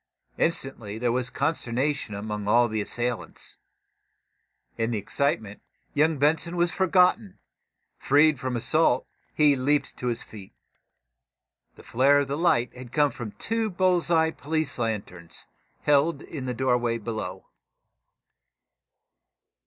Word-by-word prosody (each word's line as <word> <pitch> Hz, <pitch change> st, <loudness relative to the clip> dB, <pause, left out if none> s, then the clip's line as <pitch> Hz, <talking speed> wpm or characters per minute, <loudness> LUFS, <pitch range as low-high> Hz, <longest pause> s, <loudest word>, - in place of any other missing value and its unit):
Instantly 120 Hz, -10 st, -2 dB
there 120 Hz, +1 st, 0 dB
was 125 Hz, 0 st, -1 dB
consternation 140 Hz, -4 st, -1 dB
among 105 Hz, 0 st, -5 dB
all 120 Hz, +3 st, +4 dB
the 110 Hz, -1 st, -2 dB
assailants. 120 Hz, +3 st, -3 dB, 1.2 s
In 115 Hz, 0 st, -1 dB
the 115 Hz, -, -1 dB
excitement, 105 Hz, -1 st, -2 dB, 0.3 s
young 155 Hz, +1 st, +2 dB
Benson 160 Hz, +5 st, +1 dB
was 175 Hz, 0 st, +2 dB
forgotten. 190 Hz, +2 st, +2 dB, 0.6 s
Freed 145 Hz, 0 st, +4 dB
from 130 Hz, -1 st, -3 dB
assault, 130 Hz, +2 st, +2 dB, 0.3 s
he 150 Hz, -2 st, +4 dB
leaped 145 Hz, +3 st, 0 dB
to 125 Hz, -, -4 dB
his 120 Hz, -2 st, -2 dB
feet. 100 Hz, -, -12 dB, 1.2 s
The -, -, -15 dB
flare 140 Hz, +4 st, +3 dB
of 135 Hz, -1 st, -4 dB
light 150 Hz, -5 st, +1 dB
had 125 Hz, -1 st, -10 dB
come 145 Hz, 0 st, +2 dB
from 115 Hz, -4 st, -7 dB
two 225 Hz, 0 st, -1 dB
bull's 180 Hz, -2 st, +1 dB
eye 160 Hz, -1 st, +3 dB
police 155 Hz, -3 st, -2 dB
lanterns, 100 Hz, -7 st, -4 dB, 0.4 s
held 150 Hz, +3 st, +2 dB
in 140 Hz, -5 st, -7 dB
the 125 Hz, -, -2 dB
open -, -, -11 dB
doorway 120 Hz, -2 st, +1 dB
below. 105 Hz, -4 st, -5 dB
130 Hz, 125 wpm, -26 LUFS, 115-155 Hz, 1.2 s, all